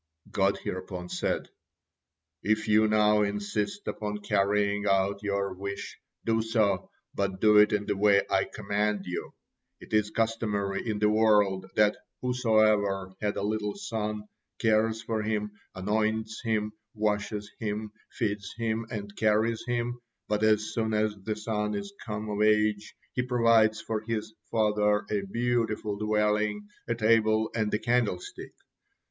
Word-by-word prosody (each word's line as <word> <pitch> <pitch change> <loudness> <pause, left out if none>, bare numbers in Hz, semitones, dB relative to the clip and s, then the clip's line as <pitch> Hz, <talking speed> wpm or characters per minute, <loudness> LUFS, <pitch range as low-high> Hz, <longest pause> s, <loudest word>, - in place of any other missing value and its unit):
God 100 0 +2
hereupon 90 -1 -5
said: - - -1 0.9
"If 110 +1 0
you 110 0 +5
now 105 0 +4
insist 105 - -2
upon 105 -1 -3
carrying 105 0 +1
out 100 +1 +2
your 100 -2 -1
wish, 100 +2 -6 0.3
do 115 0 +2
so, 110 -4 +1 0.2
but 95 -1 -2
do 105 0 +6
it 105 - +6
in 105 -1 0
the 100 - -1
way 100 0 +4
I - - +2
command 105 0 -1
you. 90 - -5 0.4
It - - -13
is 105 -1 +3
customary 110 -3 -1
in 105 - -1
the 105 0 +3
world 105 -3 +3
that 105 0 +4 0.2
whosoever 110 -6 +2
had 105 -1 -1
a - - -2
little 105 0 -1
son, 105 - -4 0.3
cares 110 0 +2
for 110 -1 -1
him, 105 -1 -1 0.2
anoints 110 +3 -1
him, 110 -2 0 0.2
washes 105 0 -1
him, 105 0 -3 0.2
feeds 100 -3 -3
him, 115 0 -1
and 100 -3 -6
carries 110 +1 +2
him, 120 0 -1 0.3
but 105 0 0
as 110 0 +2
soon 110 -1 0
as 105 0 +1
the 105 +2 -4
son 105 -1 -2
is 200 0 -5
come 105 -1 -4
of 105 0 -2
age, 105 0 +2 0.2
he 125 - 0
provides 115 -3 +3
for 110 -1 -2
his 110 -1 -4 0.2
father 105 -2 +2
a 105 -1 +1
beautiful 115 0 -1
dwelling, 105 0 0 0.2
a 115 - 0
table, 110 -1 +3
and 110 -2 0
a - - +2
candlestick. 115 -6 -1
105 Hz, 145 wpm, -28 LUFS, 105-110 Hz, 0.9 s, do